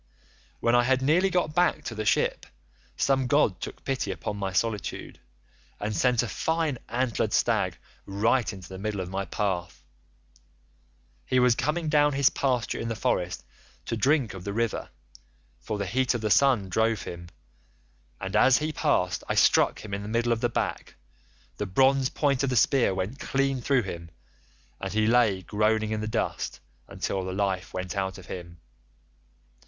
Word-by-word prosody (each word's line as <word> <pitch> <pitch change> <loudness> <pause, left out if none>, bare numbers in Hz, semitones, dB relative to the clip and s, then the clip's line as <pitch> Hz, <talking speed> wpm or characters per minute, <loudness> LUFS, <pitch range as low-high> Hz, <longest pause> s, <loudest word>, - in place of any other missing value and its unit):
"When 115 - +2
I 120 - +6
had 130 +1 +1
nearly 175 +7 +3
got 175 -4 0
back 175 +1 +2
to - - -5
the 110 -1 -4
ship - - +1 0.5
some 135 -2 +2
god 125 -8 +2
took - - -7
pity 135 -6 -1
upon 100 - -4
my 100 -2 -3
solitude, 105 +2 -2 0.6
and 105 +1 -3
sent 120 +6 +2
a - - -3
fine 160 -1 -1
antlered 120 -1 0
stag - - +1 0.3
right 110 +5 +1
into 95 -3 -10
the 95 +1 -9
middle 105 0 -3
of 90 -1 -4
my 95 +1 -2
path. 95 -5 -3 1.4
He 130 - 0
was 125 -1 +5
coming 155 +6 -1
down 150 -1 +3
his 135 -1 +4
pasture 125 -4 -1
in 115 - -3
the 115 - -2
forest 90 - -1 0.4
to - - -2
drink 130 -1 +2
of 95 -2 -8
the 100 - -4
river, 115 +1 -1 0.7
for 110 - -4
the 100 - -2
heat 125 +6 +1
of 120 - -2
the 110 -1 -1
sun 130 -8 +4
drove 110 +3 +1
him, 85 0 -8 0.9
and - - -4
as 130 -1 +6
he 155 +1 -2
passed 90 - 0
I - - 0
struck - - +3
him 100 - -7
in 100 - -2
the 105 - -6
middle 115 +1 +1
of 115 -1 0
the 120 - +2
back; - - -3 0.6
the 105 - -3
bronze 130 +6 +3
point 140 -3 +1
of 140 - +1
the 130 - -1
spear 125 -1 +3
went 95 +8 -3
clean 135 -1 0
through 130 -1 +2
him, 85 -3 -7 0.7
and - - -4
he 110 0 +1
lay 110 -5 +3
groaning 110 +1 +1
in 110 -1 -1
the 110 - -3
dust 110 - -2 0.3
until 95 -1 -3
the 95 - -4
life 95 -2 -1
went 90 +1 -4
out 95 -1 -2
of 95 - -12
him. 85 -2 -8
110 Hz, 180 wpm, -27 LUFS, 95-130 Hz, 1.4 s, I